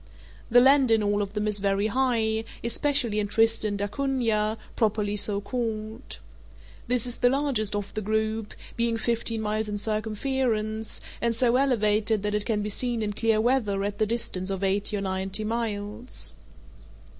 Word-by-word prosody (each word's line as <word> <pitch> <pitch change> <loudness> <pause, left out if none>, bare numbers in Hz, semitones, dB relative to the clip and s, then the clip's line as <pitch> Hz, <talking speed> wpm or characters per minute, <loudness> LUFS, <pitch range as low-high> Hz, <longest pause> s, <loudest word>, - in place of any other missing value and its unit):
The 245 +1 +7
land 270 0 +6
in 225 -1 +4
all 205 0 +1
of 200 0 -4
them 210 0 -1
is 210 -1 0
very 200 +1 +1
high, 225 -2 +1 0.2
especially 235 -2 +1
in 205 - 0
Tristan 220 -1 +2
d'Acunha, 220 -1 0 0.2
properly 210 -2 0
so 205 0 +2
called. 220 +1 -4 0.7
This 250 -2 +1
is 245 -1 -4
the 245 - +4
largest 260 -7 0
of 205 -1 -4
the 215 - -3
group, 220 +1 -1 0.2
being 235 -1 0
fifteen 230 -1 -1
miles 215 0 -1
in 205 - -2
circumference, 220 +1 -1 0.2
and 235 -1 +1
so 240 +1 +3
elevated 215 -5 +2
that 210 0 -1
it 210 -1 -1
can 210 -3 0
be 210 - -3
seen 240 +1 0
in 210 -1 -2
clear 220 0 +2
weather 220 -5 +1
at 205 +1 -3
the 215 - +2
distance 200 -5 -1
of 195 0 -3
eighty 200 +2 +1
or - - -3
ninety 190 +2 -1
miles. 220 +1 -3
220 Hz, 165 wpm, -26 LUFS, 205-235 Hz, 0.7 s, The